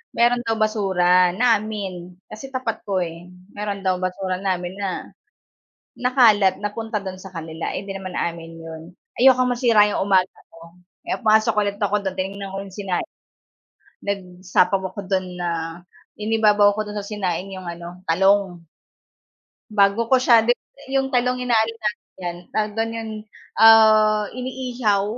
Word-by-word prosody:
meron 240 +1 +3
daw 225 - +1
basura 185 -4 +2
namin 205 -6 -1 0.2
kasi 220 +6 -8
tapat 255 -4 -3
ko 190 -2 0
eh 170 +1 -8 0.2
meron 205 -1 -5
daw 185 -1 +1
basura 185 0 -3
namin 185 -1 -2
na 195 -2 -4 0.9
nakalat 230 -7 +4
napunta 210 0 -3
dun 185 -1 -7
sa 190 - -10
kanila, 160 0 -5
hindi 195 +1 -5
naman 190 -1 -7
amin 165 -1 -4
yun, 160 -1 -9 0.4
ayokong 255 -1 +5
masira 230 -4 +4
yung 195 - -1
umaga 190 -2 +2 0.2
ko 165 0 -14 0.3
kaya - - -1
pumasok 220 0 +4
ulit 200 0 -2
ako 205 +1 +2
dun 190 0 -3
tinignan 195 +1 -4
ko - - -3
yung 195 -2 -11
sinaing 195 - -3 0.9
nagsapaw 185 -1 0
ako 200 0 -7
dun 185 -2 -2
na, 175 -1 -1 0.7
inibabaw 210 -1 +3
ako 215 0 -4
dun 210 - -6
sa 200 - -7
sinaing 195 -2 -3
yung 185 -2 -8
ano 170 +1 -8
talong. 190 0 +2 1.1
Bago 205 +2 +2
ko 260 - +6
siya 235 -3 +5 0.5
'yong 270 -1 0
talong 250 +1 +1
inaano 230 -3 +1
namin 210 -1 -2 0.2
yan 175 0 -4
tawag 210 -1 -1
do'n 225 0 -1
yon 225 -1 -5 1.3
iniihaw 250 -5 -1
200 Hz, 145 wpm, -22 LUFS, 185-220 Hz, 1.3 s, ko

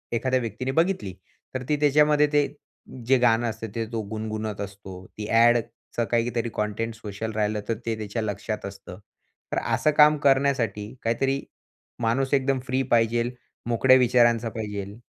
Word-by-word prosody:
एखाद्या 130 +2 +1
व्यक्तीने 120 +2 -3
बघितली. 165 - 0 0.4
तर 130 - -2
ती 150 - +3
त्याच्यामध्ये 150 0 +4
ते 145 -1 +4 0.6
जे 130 0 +5
गाणं 120 -1 +3
असतं, 110 0 -6
ते 115 -1 -1
तो 115 - -2
गुणगुणत 110 -1 -4
असतो. 95 -2 -8
ती 105 - -5
ॲडचं 115 0 +2
काहीतरी 120 0 0
कंटेंट 105 +2 -2
सोशल 110 0 -6
राहिलं 105 0 0
तर 115 - +1
ते 115 - -1
त्याच्या 110 +1 -4
लक्षात 105 0 -4
असतं. 100 -1 -9 0.5
तर - - -1 0.2
असं 155 - +2
काम 150 0 +7
करण्यासाठी 130 -6 +1
काहीतरी 135 +4 0 0.6
माणूस 130 +4 0
एकदम 135 -1 +2
फ्री 130 +2 +1
पाहिजेल 120 +1 +2 0.4
मोकळ्या 130 +3 +5
विचारांचा 120 -2 +3
पाहिजेल. 105 -1 -6
115 Hz, 145 wpm, -25 LUFS, 110-130 Hz, 0.6 s, काम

